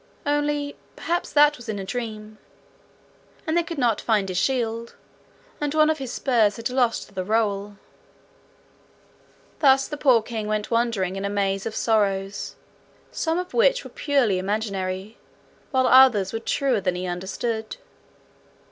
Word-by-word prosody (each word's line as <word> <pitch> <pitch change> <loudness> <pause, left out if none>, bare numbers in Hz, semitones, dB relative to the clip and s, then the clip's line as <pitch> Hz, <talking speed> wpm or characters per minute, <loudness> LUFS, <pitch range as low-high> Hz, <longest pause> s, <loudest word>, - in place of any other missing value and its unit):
only 290 0 0 0.2
perhaps 345 +2 -2
that 295 0 +5
was 240 -2 -11
in 210 - -2
a 195 - -5
dream; 215 -1 -6 1.1
and 315 -1 -1
they 345 - +4
could 335 -1 -6
not 240 -5 +1
find 210 -4 +1
his 185 - -3
shield; 235 -3 -1 0.7
and 295 0 -1
one 310 0 +5
of 315 - -3
his 265 -3 -5
spurs 225 -6 +2
had 230 +2 -4
lost 245 -5 0
the 185 - -3
rowel. 205 -1 -1 1.8
Thus 270 -2 +4
the 295 - -6
poor 250 -6 +4
king 220 -2 -4
went 215 +1 -2
wandering 230 -6 0
in 195 - -4
a 200 - -1
maze 195 0 -1
of 220 - -6
sorrows, 200 -3 0 0.6
some 325 0 -1
of 360 +1 -4
which - - +3
were - - -11
purely 280 - +1
imaginary, 195 0 -3 0.5
while 260 -2 +2
others 250 -8 +6
were 225 - -2
truer 245 -1 0
than 180 -1 0
he 180 +1 -4
understood. 210 +5 -4
225 Hz, 150 wpm, -24 LUFS, 200-275 Hz, 1.8 s, others